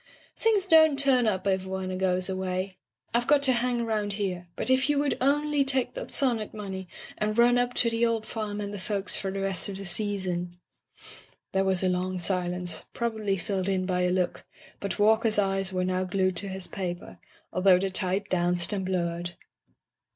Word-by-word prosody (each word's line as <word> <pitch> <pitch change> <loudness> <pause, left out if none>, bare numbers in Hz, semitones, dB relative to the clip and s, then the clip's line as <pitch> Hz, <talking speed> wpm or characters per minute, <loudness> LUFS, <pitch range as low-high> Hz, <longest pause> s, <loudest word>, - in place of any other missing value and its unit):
"Things 425 -4 +2
don't 315 -4 +6
turn 265 -4 +3
up 190 -3 0
if 190 -1 0
one 190 0 -3
goes 185 -1 +1
away. 185 0 -3 0.3
IVe 240 +1 +1
got 290 -1 +4
to 260 -2 +4
hang 245 0 0
around 215 -3 -1
here, 185 -4 -3
but - - -1
if 260 +2 +3
you 295 - +2
would 285 0 +1
only 290 +1 +2
take 265 -2 0
that - - -6
sonnet 235 -7 0
money, 190 -3 -6 0.3
and 215 +1 -1
run 240 +1 +5
up 245 0 -1
to 235 - +4
the 230 +1 0
old 230 -2 +1
farm 210 -2 -4
and 205 0 -4
the 205 - -5
folks 195 -1 -1
for 195 - -2
the 195 0 -3
rest 195 -1 0
of 195 - -5
the 195 - -6
season 180 -2 -2 0.5
'* - - -19
There 195 0 +1
was 190 -1 +1
a - - +3
long 185 0 -1
silence, 180 0 -1
probably 220 -4 -1
filled 190 +1 -2
in 185 -1 0
by 180 -1 0
a 180 - +2
look, 180 -1 -1 0.4
but 200 - -3
Walker's 220 +1 +3
eyes 195 -1 0
were 185 -1 -1
now 185 0 0
glued 185 0 0
to 200 - +3
his 190 -1 -4
paper, 175 -2 -6 0.3
although 185 0 +5
the 190 +1 -1
type 190 +1 0
danced 175 0 +2
and 195 -2 -2
blurred. 175 -2 -2
195 Hz, 195 wpm, -27 LUFS, 185-230 Hz, 0.5 s, don't